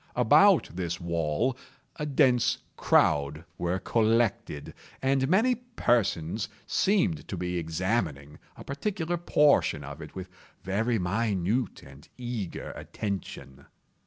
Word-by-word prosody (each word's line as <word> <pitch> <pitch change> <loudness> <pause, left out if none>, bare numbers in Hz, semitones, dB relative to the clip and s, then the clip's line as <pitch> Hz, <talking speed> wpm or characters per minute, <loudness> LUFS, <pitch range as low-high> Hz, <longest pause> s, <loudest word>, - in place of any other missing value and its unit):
About - - +5
this 85 -1 -3
wall 85 - 0 0.4
a 150 - -3
dense 130 -4 +3 0.2
crowd 75 +3 +2
were 90 +1 0
collected, 110 -8 0 0.3
and 135 0 +1
many 220 +8 +4
persons 115 - 0 0.2
seemed 185 - +1
to - - -5
be 90 0 -2
examining 80 -4 -2 0.2
a - - -9
particular 175 +3 -2
portion 150 - +3
of 70 +2 -8
it 75 - -10
with 95 -1 -6 0.4
very 110 +5 0
minute 100 +3 -1
and 70 +3 -15
eager 120 -7 -5
attention. 100 -9 -6
100 Hz, 110 wpm, -28 LUFS, 85-130 Hz, 0.4 s, About